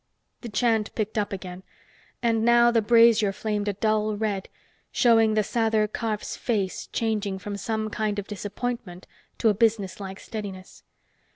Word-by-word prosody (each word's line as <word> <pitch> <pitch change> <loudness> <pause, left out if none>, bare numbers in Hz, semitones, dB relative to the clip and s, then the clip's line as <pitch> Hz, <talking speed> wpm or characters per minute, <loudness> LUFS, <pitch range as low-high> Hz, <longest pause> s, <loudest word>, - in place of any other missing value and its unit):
The 235 - -6
chant 220 0 +1
picked 215 0 -1
up 205 -1 -2
again, 185 -2 -6 0.6
and 225 -1 +2
now 235 0 +5
the 230 -1 +3
brazier 230 -2 +5
flamed 210 0 -3
a 205 - +1
dull 215 +1 0
red, 205 -3 -2 0.4
showing 225 -2 +4
the 215 - +3
Sather 220 0 +1
Karf's 215 0 -3
face 205 -6 -2
changing 210 -4 -1
from 200 +2 -6
some 215 +2 -3
kind 210 -1 -1
of 205 - -3
disappointment 205 -2 -5 0.3
to 225 - +3
a - - +4
businesslike 200 -3 -1
steadiness. 200 -4 -8
215 Hz, 150 wpm, -25 LUFS, 200-225 Hz, 0.6 s, now